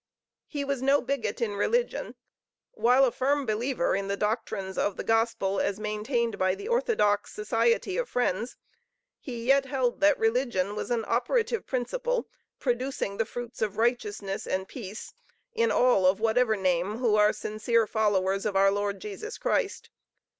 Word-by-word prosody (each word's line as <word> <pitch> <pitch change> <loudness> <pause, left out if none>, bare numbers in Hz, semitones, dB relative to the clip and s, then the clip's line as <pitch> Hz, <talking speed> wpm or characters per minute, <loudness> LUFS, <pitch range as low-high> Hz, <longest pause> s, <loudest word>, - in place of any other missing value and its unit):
He 290 -2 -3
was 275 -2 -2
no 275 +2 +4
bigot 240 -4 -2
in 210 -3 -2
religion. 475 - 0 0.6
While 260 - +4
a 250 - +1
firm 280 +3 0
believer 230 -1 0
in 195 0 -2
the 200 0 -2
doctrines 210 -3 -2
of 200 - -1
the - - -3
Gospel 225 -4 +1
as 200 +1 -1
maintained 215 +2 -1
by 185 0 +2
the 410 - -8
orthodox 440 - +1
Society 230 - +1
of - - -2
Friends, 235 -1 -1 0.6
he 240 -5 -6
yet 270 +1 +4
held 260 -3 -1
that 300 -1 +5
religion 225 -4 0
was - - -4
an 235 -2 0
operative 445 - 0
principle 485 - -1 0.3
producing 245 -5 -2
the 225 - +1
fruits 240 +1 -7
of 210 -2 -1
righteousness 210 -4 -1
and 190 0 -2
peace, 215 -3 -8 0.4
in 465 0 +2
all 245 -7 +4
of 190 +2 +3
whatever 225 +1 +2
name, 185 +2 0
who 235 -3 +1
are 210 0 +5
sincere 220 +2 0
followers 195 -3 +1
of 210 -2 -2
our 195 0 +5
Lord 200 0 -2
Jesus 435 - -6
Christ. - - -1
230 Hz, 160 wpm, -27 LUFS, 205-260 Hz, 0.6 s, that